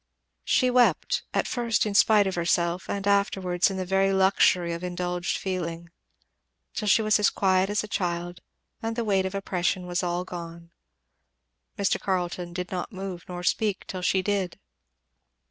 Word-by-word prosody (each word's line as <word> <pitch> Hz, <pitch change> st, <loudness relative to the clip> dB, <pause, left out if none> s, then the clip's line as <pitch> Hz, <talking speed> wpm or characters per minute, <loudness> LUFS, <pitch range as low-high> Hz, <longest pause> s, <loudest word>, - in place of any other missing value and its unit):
She 255 Hz, -1 st, +3 dB
wept, 245 Hz, -1 st, +3 dB
at -, -, 0 dB
first 235 Hz, -3 st, 0 dB
in 210 Hz, -, -2 dB
spite 210 Hz, 0 st, +5 dB
of 190 Hz, -, -1 dB
herself 170 Hz, +1 st, 0 dB
and 200 Hz, -1 st, -3 dB
afterwards 195 Hz, -3 st, +2 dB
in 195 Hz, -, -4 dB
the 185 Hz, -, -2 dB
very 195 Hz, +1 st, +2 dB
luxury 190 Hz, -2 st, +3 dB
of 170 Hz, +1 st, -6 dB
indulged 180 Hz, 0 st, -2 dB
feeling; 170 Hz, -3 st, -4 dB, 0.8 s
till 210 Hz, -, -3 dB
she 220 Hz, +2 st, +4 dB
was 215 Hz, 0 st, +3 dB
as 210 Hz, -, +4 dB
quiet 190 Hz, 0 st, +2 dB
as 210 Hz, +1 st, 0 dB
a -, -, -6 dB
child, 175 Hz, -3 st, -3 dB, 0.4 s
and 225 Hz, 0 st, -3 dB
the 235 Hz, -1 st, -2 dB
weight 195 Hz, -2 st, +2 dB
of 190 Hz, -, -7 dB
oppression 185 Hz, -1 st, -1 dB
was 175 Hz, 0 st, -1 dB
all 175 Hz, 0 st, -1 dB
gone. 170 Hz, -1 st, -8 dB, 1.1 s
Mr. 200 Hz, -1 st, +1 dB
Carleton 180 Hz, -2 st, -2 dB
did 180 Hz, +1 st, -5 dB
not 185 Hz, +4 st, -4 dB
move, 190 Hz, -3 st, -6 dB
nor 180 Hz, 0 st, -6 dB
speak, 205 Hz, +2 st, 0 dB
till 185 Hz, -, -6 dB
she 185 Hz, +1 st, +1 dB
did. 195 Hz, -3 st, -1 dB
185 Hz, 165 wpm, -26 LUFS, 175-200 Hz, 1.1 s, spite